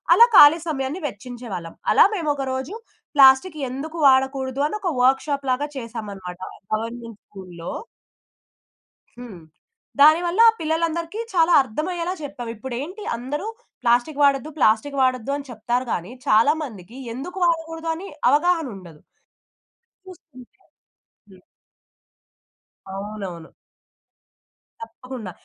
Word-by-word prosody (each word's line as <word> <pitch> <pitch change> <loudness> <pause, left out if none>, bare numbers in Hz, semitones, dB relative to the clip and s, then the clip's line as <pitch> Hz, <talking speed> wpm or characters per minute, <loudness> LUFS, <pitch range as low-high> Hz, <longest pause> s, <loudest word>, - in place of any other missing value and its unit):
అలా 470 - +9
ఖాళీ 295 +3 +9
సమయాన్ని 280 +4 -3
వెచ్చించేవాళ్ళం. 225 -7 -8 0.2
అలా - - +7
మేమొక 290 -6 -2
రోజు 265 +10 -4 0.4
ప్లాస్టిక్ 275 +4 +6
ఎందుకు 300 +6 -6
వాడకూడదు 265 0 +2
అని 365 - -5
ఒక 365 - -1
వర్క్‌షాప్ 275 +2 +1
లాగా 275 +4 -1
చేశామనమాట. 205 -7 -7 0.3
గవర్నమెంట్ 230 0 -5
స్కూల్‌లో. 180 -4 -9 1.5
హ్మ్. 220 -8 -10 0.6
దానివల్ల 340 +6 +5 0.2
పిల్లలందరికి 330 +4 -2
చాలా 340 -1 +3
అర్థమయ్యేలా 340 +8 -3
చెప్పాం. 275 -4 -7
ఇప్పుడేంటి 265 - -6
అందరూ 285 - -5 0.4
ప్లాస్టిక్ 245 +5 +1
వాడొద్దు, 280 +1 +3
ప్లాస్టిక్ 270 +3 +2
వాడొద్దు 255 0 +1
అని 285 -1 -9
చెప్తారు 240 +3 -2
కానీ, 175 +5 -4 0.2
చాలా 225 +8 +5
మందికి 220 -2 -10 0.2
ఎందుకు 280 +10 -7
వాడకూడదు 325 -1 -2
అని 375 +4 -8 0.2
అవగాహన 325 +2 +2
ఉండదు. 170 -5 -13 1.1
చూస్తుంటే 295 -8 -15 0.7
హ్మ్. 190 -1 -17 1.5
అవునవును. 195 -4 -7 1.3
తప్పకుండా. 255 - -8
265 Hz, 100 wpm, -22 LUFS, 225-315 Hz, 1.5 s, అలా